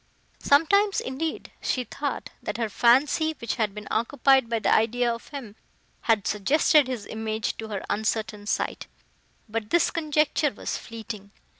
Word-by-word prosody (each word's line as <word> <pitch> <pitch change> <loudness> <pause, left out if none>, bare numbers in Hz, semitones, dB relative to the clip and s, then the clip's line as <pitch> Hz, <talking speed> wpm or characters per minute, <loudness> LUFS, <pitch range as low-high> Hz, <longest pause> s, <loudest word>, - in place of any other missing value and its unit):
Sometimes, 395 +8 +4
indeed, 280 +5 -4
she 255 - 0
thought, 285 +5 -4
that - - -4
her 230 -2 -1
fancy, 275 +8 +3
which 235 +1 -3
had 215 -4 0
been 210 -1 -8
occupied 265 +2 +3
by 230 - +1
the 220 - +2
idea 235 +2 +2
of 230 - -9
him, 255 -8 -8 0.5
had 220 -3 +3
suggested 285 - +3
his 250 -5 -4
image 220 -1 -3
to 220 - -6
her 205 -3 -5
uncertain 215 -1 -2
sight: - - -2 0.6
but 215 -1 -4
this 340 - +3
conjecture 305 -2 +1
was - - -4
fleeting. 220 -3 -8
235 Hz, 150 wpm, -26 LUFS, 215-285 Hz, 0.6 s, Sometimes